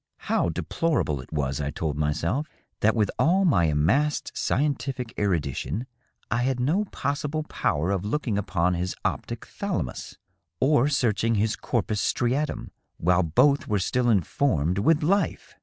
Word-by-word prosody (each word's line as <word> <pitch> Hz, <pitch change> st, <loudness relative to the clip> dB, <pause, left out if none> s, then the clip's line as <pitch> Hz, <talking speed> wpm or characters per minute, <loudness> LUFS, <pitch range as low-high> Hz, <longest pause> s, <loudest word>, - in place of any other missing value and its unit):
How -, -, +1 dB
deplorable 85 Hz, -, -1 dB
it 65 Hz, -, -15 dB
was, 70 Hz, -2 st, -1 dB
I 70 Hz, -, -2 dB
told 75 Hz, 0 st, -3 dB
myself, 85 Hz, -, -1 dB, 0.3 s
that 110 Hz, +2 st, +3 dB
with 105 Hz, -3 st, +1 dB
all 190 Hz, +4 st, +4 dB
my 110 Hz, -, +4 dB
amassed 90 Hz, -, +1 dB
scientific 135 Hz, -4 st, -1 dB
erudition 85 Hz, -, -1 dB, 0.5 s
I 115 Hz, -, +2 dB
had 130 Hz, 0 st, 0 dB
no 165 Hz, +12 st, +1 dB
pos 145 Hz, -7 st, -2 dB
sible 155 Hz, +2 st, -3 dB
power 80 Hz, +6 st, 0 dB
of 95 Hz, -2 st, -1 dB
looking 115 Hz, +1 st, -1 dB
upon 90 Hz, -3 st, +1 dB
his 90 Hz, +1 st, -2 dB
optiG -, -, -3 dB
thalamus 60 Hz, -, -4 dB, 0.4 s
or 140 Hz, 0 st, +4 dB
searching 115 Hz, -5 st, +1 dB
his 105 Hz, +1 st, +1 dB
corpus 105 Hz, -3 st, -1 dB
striaium 135 Hz, +5 st, -1 dB, 0.3 s
while 90 Hz, +2 st, +3 dB
both 140 Hz, -, +3 dB
were 105 Hz, -, +1 dB
still 120 Hz, +6 st, +1 dB
informed 95 Hz, -, +1 dB
with 155 Hz, +8 st, +3 dB
life 195 Hz, +6 st, 0 dB
110 Hz, 145 wpm, -26 LUFS, 85-140 Hz, 0.5 s, all